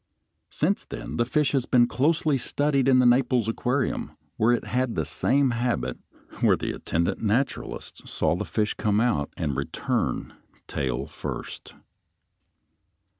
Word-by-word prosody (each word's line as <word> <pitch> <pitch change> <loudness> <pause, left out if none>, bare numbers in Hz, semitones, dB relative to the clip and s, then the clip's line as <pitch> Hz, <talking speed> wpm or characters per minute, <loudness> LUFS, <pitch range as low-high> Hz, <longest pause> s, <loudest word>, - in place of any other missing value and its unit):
Since - - 0
then - - -6
the 120 - +2
fish 145 0 +2
has 135 -3 0
been 120 -2 +5
closely 150 +4 +1
studied 140 +1 0
in 130 -1 +6
the 125 - +5
Naples 120 -2 +3
Aquarium, 125 +3 -1 0.2
where 110 +2 +3
it 120 - 0
had 125 -1 -1
the 80 - 0
same 130 - +2
habit, 115 - -1 0.3
and - - -14
where - - +4
the - - -3
attendant 85 +1 -1
naturalists 115 +5 -2
saw 80 0 +1
the - - -2
fish 110 -1 -1
come 105 -1 +1
out, 110 -12 +1
and 75 -5 -1
return - - -2 0.3
tail 65 -1 -2
first. - - -7
120 Hz, 145 wpm, -26 LUFS, 100-130 Hz, 0.3 s, in